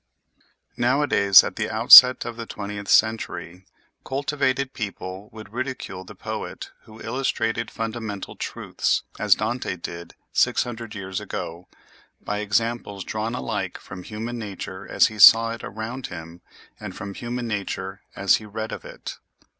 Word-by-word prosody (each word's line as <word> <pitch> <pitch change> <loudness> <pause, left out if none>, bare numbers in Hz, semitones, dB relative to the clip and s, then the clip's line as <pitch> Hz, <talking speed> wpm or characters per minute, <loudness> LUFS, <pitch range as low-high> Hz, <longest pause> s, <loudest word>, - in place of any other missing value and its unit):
Nowadays, 120 -6 +5
at - - -6
the - - -2
outset 125 0 +9
of 120 - -5
the 115 -1 -7
twentieth 100 -1 -6
century, 95 -5 +1 0.4
cultivated 135 -1 -1
people 100 -2 -6
would 110 -1 -12
ridicule 125 -7 -5
the - - -12
poet - - -6
who 110 0 -14
illustrated 115 -3 -2
fundamental 110 -3 -5
truths, - - -2 0.2
as - - +5
Dante 120 -5 -2
did 85 -1 -8 0.2
six - - +3
hundred 115 -3 -7
years 95 -2 -4
ago, 85 +2 -6 0.5
by 105 0 -4
examples 105 -1 -1
drawn 110 +4 -3
alike 105 -7 -3
from 95 - -10
human 115 +5 -6
nature 95 -2 -7
as - - +4
he 110 -2 -4
saw 115 +2 +9
it 115 - -7
around 115 +5 -6
him 85 0 -10 0.4
and - - -8
from 100 0 -7
human 120 +3 -5
nature 100 -2 -4
as 100 -1 +3
he 110 - -11
read 110 +2 -5
of - - -7
it. - - -9
110 Hz, 145 wpm, -24 LUFS, 100-120 Hz, 0.5 s, outset